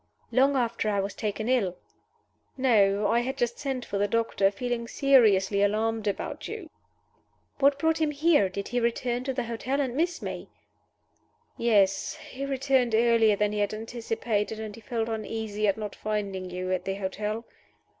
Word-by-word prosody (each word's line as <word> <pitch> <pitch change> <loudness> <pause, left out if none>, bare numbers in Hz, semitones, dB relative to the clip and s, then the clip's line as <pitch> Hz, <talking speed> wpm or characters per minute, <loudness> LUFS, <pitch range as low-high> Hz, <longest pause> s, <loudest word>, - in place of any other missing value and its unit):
"Long 270 +2 +4
after 235 -3 0
I 200 -1 +1
was 195 +1 -2
taken 215 0 -3
ill?" 215 -8 +1 0.8
"No. 210 -6 +3
I 230 +3 +3
had 255 +2 -3
just 240 -1 -1
sent 265 -3 -3
for 200 - -3
the 205 - +2
doctor 205 -2 +2
feeling 235 +3 -3
seriously 215 -8 +4
alarmed 215 +1 +1
about 200 - -3
you." 400 -8 -7 0.9
"What 280 0 +4
brought 320 +2 +1
him 310 - +3
here? 295 - +3
Did 200 +1 -5
he 245 - 0
return 240 +1 -1
to 270 - 0
the 250 - -1
hotel 235 +4 -2
and 260 -4 0
miss 335 +3 0
me?" - - -6 1.1
"Yes. 200 -5 +2
He 275 -3 -7
returned 265 -3 +1
earlier 225 -2 +4
than 210 0 +1
he 210 - -2
had 205 +1 0
anticipated, 225 -1 -2
and 215 -1 -6
he 230 - -12
felt 225 +1 -2
uneasy 220 -1 -2
at 200 +1 +2
not 210 -2 -5
finding 200 -3 -3
you 185 +1 -4
at 185 - -1
the 195 - -2
hotel." 210 +3 -3
225 Hz, 170 wpm, -27 LUFS, 205-255 Hz, 1.1 s, Long